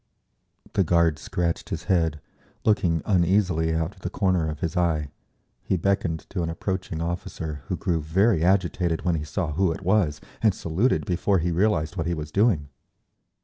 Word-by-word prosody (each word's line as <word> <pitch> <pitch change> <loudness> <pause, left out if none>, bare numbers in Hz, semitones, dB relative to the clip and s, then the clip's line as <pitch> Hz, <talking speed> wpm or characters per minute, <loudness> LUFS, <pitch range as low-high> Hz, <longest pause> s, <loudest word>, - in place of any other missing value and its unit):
The 95 - +3
guard 85 -3 +2
scratched 85 +1 -2
his - - -4
head, 80 -4 +1 0.5
looking 85 -7 +2
uneasily 90 -3 +2
out 80 +4 -1
of 95 - -21
the 90 - -3
corner 90 -5 +1
of 75 -1 -6
his 85 +1 -2
eye; 80 -5 +1 0.5
he 95 - 0
beckoned 85 -3 0
to 90 - -2
an 85 - -1
approaching 85 -1 -3
officer, 80 -3 -4
who - - -2
grew 85 -2 0
very 90 +3 +2
agitated 90 -2 +1
when 90 - +2
he 80 -2 -1
saw 80 +2 -2
who 95 +3 +2
it 80 - -5
was 90 -6 +2 0.2
and 110 -4 +3
saluted 95 +12 0
before 95 +1 +1
he 85 0 0
realised 90 -2 +1
what 80 -1 -1
he 85 - 0
was 75 -1 -6
doing. 95 - +2
85 Hz, 175 wpm, -25 LUFS, 80-95 Hz, 0.5 s, The